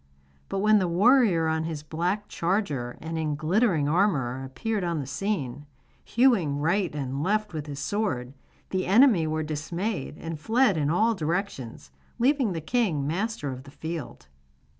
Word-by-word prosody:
But 195 - -1
when 215 0 +5
the 185 - +1
warrior 195 -2 +4
on 160 0 0
his 155 -2 -5
black 175 +7 -2
charger 165 - -1
and 160 +1 -4
in 155 -2 -1
glittering 165 0 +2
armour 145 -8 +1
appeared 205 - -3
on 170 -2 -1
the 140 - -4
scene, 145 -3 -3 0.4
hewing 225 - +3
right 175 +5 +1
and 135 -1 -3
left 210 +3 0
with 155 -1 -5
his 145 -1 -6
sword, 140 - -2 0.4
the 185 -1 -1
enemy 205 - +5
were 155 0 -1
dismayed 160 +4 -3
and 165 -2 -6
fled 225 +4 +3
in 150 -2 0
all 220 +8 +3
directions, 165 - -3 0.3
leaving 255 -3 +2
the 165 - -4
king 170 - 0
master 185 -1 -2
of 130 0 -7
the 140 - -14
field. 160 - -7
165 Hz, 160 wpm, -26 LUFS, 150-210 Hz, 0.4 s, when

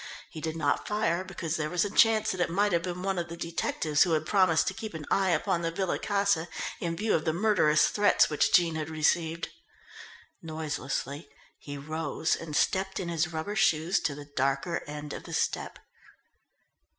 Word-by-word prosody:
He 155 - -8
did 160 0 -3
not 145 -3 0
fire 185 -4 0
because 170 -4 -4
there 155 -1 -2
was 180 +3 +1
a - - -2
chance 220 0 +4
that 185 - -3
it - - +1
might 205 +4 +2
have 170 - +2
been 180 +1 -5
one 195 -2 0
of 170 - -3
the 170 - -7
detectives 165 -3 -1
who 175 -3 +5
had 155 0 +1
promised 185 -5 +3
to - - 0
keep 215 -2 -7
an 155 -2 -6
eye 195 -1 +3
upon 180 0 +1
the 165 - 0
Villa 180 +2 -2
Casa 200 -5 +1 0.3
in 170 -1 -2
view 215 +3 0
of 155 - +1
the 160 - 0
murderous 170 -6 +3
threats 205 0 +4
which 150 - +1
Jean 170 -2 +4
had 155 -1 -3
received. 160 +1 0 0.9
Noiselessly 150 -2 -4 0.3
he 145 0 -7
rose 155 +2 -1
and 155 -3 -6
stepped 190 +3 +1
in 175 - -3
his 170 0 0
rubber 165 +6 -4
shoes 175 -3 +2
to 145 - -2
the 145 0 -9
darker 145 +5 -1
end 150 0 -6
of - - -8
the - - -8
stoep. - - -1
170 Hz, 195 wpm, -28 LUFS, 155-190 Hz, 0.9 s, who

